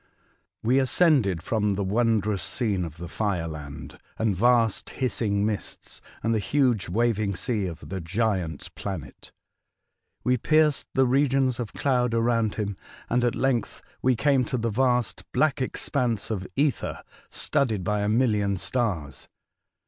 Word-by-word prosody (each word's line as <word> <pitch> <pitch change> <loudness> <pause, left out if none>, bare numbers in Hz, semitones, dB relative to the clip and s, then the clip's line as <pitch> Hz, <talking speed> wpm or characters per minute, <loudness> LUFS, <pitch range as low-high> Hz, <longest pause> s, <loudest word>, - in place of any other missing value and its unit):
WE 125 +4 +4
ascended 130 - +3
from 105 -3 0
tlie 100 0 -1
wondrous 105 -2 +1
scene 100 +1 -1
of 80 -2 -7
the 85 +1 -6
fire 90 -3 -1
land 75 -2 -8 0.2
and 110 -3 +1
vast, 115 +1 +2
hissing 105 -6 0
mists, 105 -2 -4 0.2
and 115 +1 +2
the 110 - +2
huge 120 -5 +1
waving 110 -1 +1
sea 105 +1 -1
of 85 -3 -8
the 95 -1 -4
giant 90 -3 -2
planet. 95 -8 -7 0.9
We 125 0 +2
pierced 155 +3 +2
the 135 - +5
regions 130 -1 +2
of 120 -3 -4
clouds 125 -4 +1
around 115 -2 +1
him, 100 -3 -3 0.3
and 120 +1 +2
at 120 - +1
length 130 -4 -1 0.2
we 130 0 +3
came 135 +1 +3
to 130 - -2
the 115 -1 -1
vast, 125 0 +1
black 155 -3 +2
expanse 125 -4 -1
o£ 95 -4 -3
ether, 140 -1 0 0.3
studded 110 -8 0
by 105 +2 0
a 105 - 0
million 105 -4 +2
stars. 85 - -2
110 Hz, 145 wpm, -26 LUFS, 100-125 Hz, 0.9 s, the